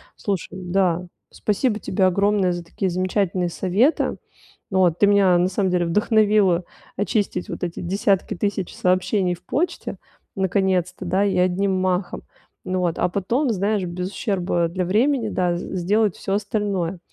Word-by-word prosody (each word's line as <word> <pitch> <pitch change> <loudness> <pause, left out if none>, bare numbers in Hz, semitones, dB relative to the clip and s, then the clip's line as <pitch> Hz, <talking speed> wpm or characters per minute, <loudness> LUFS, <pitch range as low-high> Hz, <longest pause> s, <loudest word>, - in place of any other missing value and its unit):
Слушай, 195 -4 -3
да, 180 -1 0 0.3
спасибо 210 +2 0
тебе 190 -2 0
огромное 200 0 +2
за 175 0 -5
такие 185 +3 -3
замечательные 185 0 0
советы. 200 - +1 0.5
Вот, 180 -3 +3
ты 205 - +6
меня 195 -3 +5
на 180 +1 +2
самом 190 0 0
деле 175 -1 +1
вдохновила 210 -1 +3 0.3
очистить 200 -2 -1
вот - - -6
эти 175 -1 -3
десятки 195 +2 0
тысяч 195 -1 -2
сообщений 185 0 +1
в 180 - -23
почте 345 +5 -2 0.4
наконец-то, 190 -1 0
да, 190 +3 +1
и 195 - 0
одним 185 +2 +2
махом. 185 0 -1 0.4
Ну 185 0 -1
вот, 170 -2 0
а - - +3
потом, 235 +9 0
знаешь, 200 0 0
без 180 +2 -4
ущерба 180 -5 0
для 185 +1 -2
времени, 230 +4 +1
да, 180 -3 0
сделать 195 +3 0
всё 195 - -3
остальное, 200 -4 -2
190 Hz, 145 wpm, -22 LUFS, 180-205 Hz, 0.5 s, ты